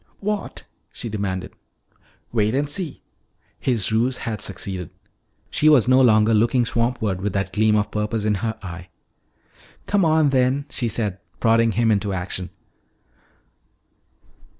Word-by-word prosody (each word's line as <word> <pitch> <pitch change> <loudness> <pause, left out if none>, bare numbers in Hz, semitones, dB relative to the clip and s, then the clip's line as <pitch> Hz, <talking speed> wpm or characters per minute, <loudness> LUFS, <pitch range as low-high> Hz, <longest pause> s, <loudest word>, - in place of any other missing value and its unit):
"What?" 210 0 -4 0.3
she 115 - -6
demanded. 100 -3 -3 0.8
"Wait 110 0 +1
and 145 +2 +1
see." 150 +1 -4 0.6
His 115 -7 +1
ruse 120 +4 +1
had 110 -2 -3
succeeded. 95 -3 -5 0.6
She 155 - +3
was 135 -8 +5
no 130 +1 +5
longer 110 -2 +5
looking 115 +3 +3
swampward 115 -5 -1
with 100 -1 -2
that 100 -1 -2
gleam 110 0 +3
of 105 0 0
purpose 105 0 -2
in 105 - +2
her 110 -1 -2
eye. 90 -1 -8 1.0
"Come 200 -2 +2
on 155 -3 +3
then," 130 +1 +2
she 120 - -1
said, 105 -4 -2 0.2
prodding 115 -1 +3
him 115 +2 +2
into 100 -1 0
action. 90 0 -4
110 Hz, 135 wpm, -22 LUFS, 100-125 Hz, 1.0 s, was